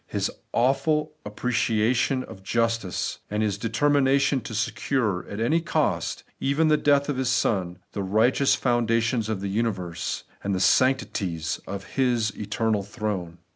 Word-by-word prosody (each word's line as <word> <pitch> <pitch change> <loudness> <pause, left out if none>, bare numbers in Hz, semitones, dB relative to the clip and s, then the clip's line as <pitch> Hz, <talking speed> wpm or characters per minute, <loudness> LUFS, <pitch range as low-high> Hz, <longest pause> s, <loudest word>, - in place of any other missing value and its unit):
His - - -1 0.2
awful 150 +5 +1
appreciation 120 +3 +1
of 95 - -11
justice, 115 -1 -1
and 105 +1 0
His 105 -1 -1
determination 140 +3 +2
to 110 0 -7
secure, 110 -2 -1
at 100 - -5
any 150 +9 +2
cost, 165 - -1
— - - -46
even 155 +2 +3
the 155 - +5
death 140 -1 +3
of 145 -3 -2
His 130 -1 0
Son, 95 -7 0
— - - -47
the 100 - -3
righteous 110 +8 +3
foundations 115 -2 +1
of 105 -3 -2
the 100 - -2
universe, 100 -5 -2 0.2
and 100 -1 0
the - - -1
sanctities 95 -10 +1
of 100 0 -5
His 120 0 0
eternal 105 +1 -1
throne. 100 -5 -4
115 Hz, 150 wpm, -25 LUFS, 100-130 Hz, 0.2 s, the